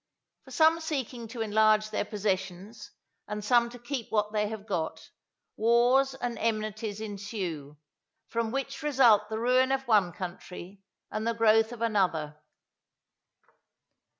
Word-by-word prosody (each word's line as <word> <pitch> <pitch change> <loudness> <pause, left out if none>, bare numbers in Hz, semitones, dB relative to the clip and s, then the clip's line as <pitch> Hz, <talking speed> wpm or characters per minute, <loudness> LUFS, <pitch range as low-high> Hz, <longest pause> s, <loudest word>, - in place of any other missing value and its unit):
For - - -14
some 320 +1 +4
seeking 265 -7 -4
to 230 0 -7
enlarge 215 0 +3
their 215 - -1
possessions, 200 0 -4 0.4
and 210 0 -5
some 235 +1 +4
to 245 - -11
keep 245 0 -5
what 210 -1 0
they 210 -1 +1
have 215 -1 -7
got, 160 -7 -4 0.4
wars 245 +4 +3
and 245 -3 -4
enmities 215 -1 -2
ensue, 195 -9 -5 0.5
from 230 -1 -2
which 270 +5 -4
result 260 -8 +4
the 220 - -3
ruin 255 +3 +3
of 270 -1 -1
one 205 -6 +4
country 185 +2 -8 0.3
and 215 +1 -3
the 230 - 0
growth 225 0 +4
of 235 -1 -5
another. 165 -9 0
220 Hz, 135 wpm, -28 LUFS, 205-240 Hz, 0.5 s, some